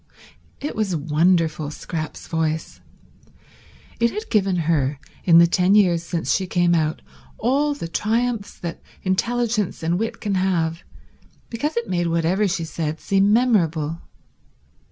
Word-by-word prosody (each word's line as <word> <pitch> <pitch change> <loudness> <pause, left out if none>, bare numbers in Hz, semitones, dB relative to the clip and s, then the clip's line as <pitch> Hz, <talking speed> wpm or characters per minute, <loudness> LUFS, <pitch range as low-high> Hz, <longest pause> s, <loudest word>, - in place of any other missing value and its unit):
It 295 - -4
was 210 -5 0
wonderful, 160 0 +1
Scrap's 155 +1 -6
voice. 160 0 -2 1.2
It 235 0 +3
had 425 - -6
given 195 -4 +2
her, 145 -4 +1 0.3
in 170 -2 +7
the 170 - +8
ten 180 +3 +3
years 180 -5 +4
since 170 0 -1
she 190 - 0
came 175 -1 +2
out, 155 -2 0 0.3
all 285 +5 +1
the 225 - -5
triumphs 225 +3 -1
that 170 -1 -6 0.2
intelligence 215 0 0
and 170 +3 +1
wit 225 +1 -3
can 205 -2 -2
have, 175 -3 0 0.7
because 290 +6 -2
it 235 - -1
made 175 -2 0
whatever 170 +5 +1
she 175 -2 -1
said 160 -1 -3
seem 195 +1 +2
memorable. 170 -10 +2
180 Hz, 135 wpm, -22 LUFS, 165-215 Hz, 1.2 s, the